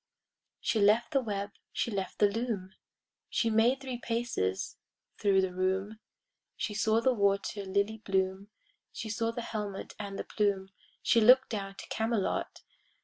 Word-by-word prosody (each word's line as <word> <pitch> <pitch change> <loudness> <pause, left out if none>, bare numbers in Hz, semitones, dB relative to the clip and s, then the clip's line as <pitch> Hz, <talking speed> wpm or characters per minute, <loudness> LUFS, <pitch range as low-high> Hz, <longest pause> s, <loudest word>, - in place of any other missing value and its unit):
She 220 - 0
left 210 +5 +4
the 275 -3 +3
web, 205 -3 -3 0.2
she 235 - -1
left 195 -3 -3
the 205 - +5
loom, 200 -3 -3 0.6
She 230 - +1
made 235 +5 +3
three 255 -3 -5
paces 230 - -2 0.4
thro' 200 -2 +4
the 190 -1 0
room, 190 +3 -1 0.6
She 210 - -2
saw 220 +2 +2
the 260 +2 +3
water 200 -1 +1
lily 200 +3 0
bloom, 190 0 -1 0.4
She 220 - -6
saw 225 +1 0
the 230 +1 -4
helmet 210 -4 -5
and 200 -1 -5
the - - -3
plume, 200 -2 0 0.3
She 230 - +4
look'd 255 +4 +7
down 195 -2 -4
to - - -9
Camelot. 225 -2 -1
210 Hz, 150 wpm, -31 LUFS, 195-230 Hz, 0.6 s, look'd